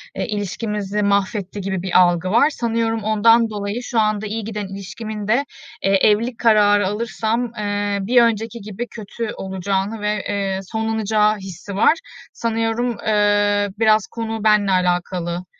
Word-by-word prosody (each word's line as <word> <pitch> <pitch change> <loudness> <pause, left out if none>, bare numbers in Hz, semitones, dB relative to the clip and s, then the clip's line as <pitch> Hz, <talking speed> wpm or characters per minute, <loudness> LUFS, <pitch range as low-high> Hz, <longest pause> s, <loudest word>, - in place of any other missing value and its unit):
eee, - - -2
ilişkimizi 210 0 -3
mahvetti 200 0 0
gibi 190 -1 -3
bir 185 0 +3
algı 175 0 +3
var. 280 +7 +5
Sanıyorum 230 -4 -1
ondan 225 +2 +4
dolayı 205 +2 -4
şu 240 -2 -1
anda 215 -1 +1
iyi 220 +2 -4
giden 210 -1 -5
ilişkimin 210 +2 -7
de, 245 +6 +2 0.4
eee, 195 - +2 0.2
evlilik 225 +3 +1
kararı 205 -3 +4
alırsam, 225 +2 -2
eee, 205 -1 -1
bir 240 +5 +4
önceki 230 0 0
gibi 215 +4 -6
kötü 220 0 -6
olacağını 195 +3 -3
ve, 210 0 0
eee, 195 -2 -1
sonlanacağı 220 0 0
hissi 190 0 -8
var. 205 - +5 0.4
Sanıyorum, 230 +1 -1
eee, 205 -1 +2
biraz 215 -2 +4
konu 225 -2 -5
benle 210 -2 +4
alakalı. 180 -1 -1
210 Hz, 140 wpm, -20 LUFS, 200-225 Hz, 0.4 s, var